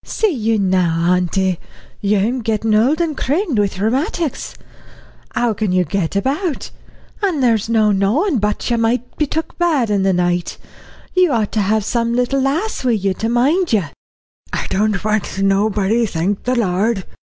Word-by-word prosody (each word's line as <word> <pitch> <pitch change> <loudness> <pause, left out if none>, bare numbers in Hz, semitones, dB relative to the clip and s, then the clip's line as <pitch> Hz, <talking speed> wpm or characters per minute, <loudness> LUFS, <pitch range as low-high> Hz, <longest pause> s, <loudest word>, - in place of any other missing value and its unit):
"See 435 -3 0
you 225 -6 0
now, 180 -3 +2
auntie, 180 0 0 0.4
you'm 210 +5 +1
gettin' 220 -1 0
old 245 +9 +3
and 330 -3 0
crimmed 300 - 0
wi' 205 -1 +2
rheumatics. 265 - -2 0.8
How 235 -2 +1
can 210 -2 -1
you 185 0 +3
get 170 +2 -2
about? 280 - -1 0.5
An' 375 -7 0
there's 230 -4 +2
no 220 -2 +3
knowin' 235 - +1
but 210 +3 -1
you 235 - +1
might 235 +2 -1
be 300 - +1
took 320 +5 -4
bad 300 -11 +1
in 200 -1 +2
the 190 0 +2
night. 175 -1 0 0.6
You 365 -4 +3
ought 225 -4 0
to 215 - 0
have 210 +1 +1
some 235 +1 0
little 250 +2 +1
lass 310 +11 -1
wi' 250 -2 +2
you 200 -3 0
to 220 +4 -3
mind 280 +8 +2
you." 210 -4 +3 0.7
"I - - -2
don't 210 0 0
want 215 -2 -1
nobody, 205 +3 +2
thank 190 +3 -2
the 250 +1 +1
Lord." 200 -1 0
220 Hz, 165 wpm, -18 LUFS, 195-260 Hz, 0.8 s, old